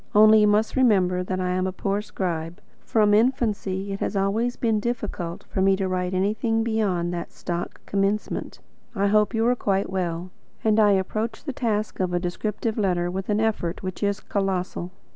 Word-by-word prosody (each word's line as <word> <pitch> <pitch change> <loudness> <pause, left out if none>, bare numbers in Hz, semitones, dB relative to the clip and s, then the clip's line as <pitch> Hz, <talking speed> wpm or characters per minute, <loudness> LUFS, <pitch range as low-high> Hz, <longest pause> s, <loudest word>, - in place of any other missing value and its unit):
Only 215 +1 +8
you 210 - +5
must 210 +1 +2
remember 190 -8 +3
that 185 0 -3
I 180 0 0
am 185 +1 0
a - - -2
poor 195 +2 -1
scribe. 170 -4 -4 0.2
From 210 -2 +3
infancy 210 -4 +1
it 195 - -5
has - - -2
always 215 +5 +1
been 225 -3 +1
difficult 210 -7 -4
to 190 - 0
me 195 0 +4
to 190 0 -1
write 185 0 -1
anything 220 +4 +1
beyond 195 -6 0
that 170 -1 -5
stock 175 0 -5
commencement: 200 +1 -1 0.4
"I 200 -1 +1
hope 210 +2 +3
you 225 0 +2
are 245 +1 +3
quite 195 -4 0
well;" 180 -1 -2 0.3
and 220 0 +3
I 205 -2 +6
approach 215 +4 -2
the 280 - -4
task 215 -4 -1
of 180 -1 0
a - - +2
descriptive 210 +5 -2
letter 175 -3 +1
with 190 +2 -4
an 210 0 +2
effort 210 -7 -1
which 185 -1 -5
is 200 0 0
colossal. 185 -3 -2
200 Hz, 185 wpm, -24 LUFS, 185-215 Hz, 0.4 s, Only